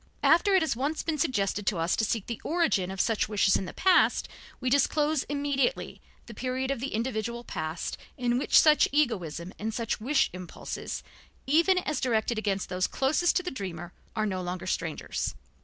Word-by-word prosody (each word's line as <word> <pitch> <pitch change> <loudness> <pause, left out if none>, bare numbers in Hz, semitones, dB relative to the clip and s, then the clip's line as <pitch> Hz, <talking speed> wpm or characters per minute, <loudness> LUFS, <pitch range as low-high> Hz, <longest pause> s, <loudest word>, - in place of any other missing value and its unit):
After 380 +4 +5
it 370 - +4
has 315 - 0
once 285 +6 -2
been 315 -2 -2
suggested 205 - 0
to 195 - +1
us 165 +2 +1
to - - 0
seek 220 -1 -1
the 235 -2 -6
origin 320 - +1
of 190 0 -6
such 225 0 +1
wishes 200 -2 +3
in 195 - -1
the 170 - -6
past, 370 -2 +3 0.3
we 255 - -4
disclose 295 +2 +2
immediately 285 - -1 0.2
the 235 - -10
period 260 +3 -2
of 275 - -2
the 270 -1 -3
individual 235 0 -2
past 160 -6 -4 0.2
in 245 -1 +1
which - - +5
such 305 -1 +5
egoism 190 - -1
and 220 +1 -3
such 230 -2 -2
wish 270 +5 +2
impulses, 180 -1 -6 0.4
even 335 +7 +4
as 305 -6 -1
directed 230 -2 +1
against 200 -3 -1
those 180 0 0
closest 300 +6 +1
to 365 - +1
the 360 - -4
dreamer, 175 -7 -6 0.2
are 215 - 0
no 190 -3 -2
longer 180 +1 -4
strangers. 165 -4 -3
235 Hz, 185 wpm, -28 LUFS, 195-290 Hz, 0.4 s, After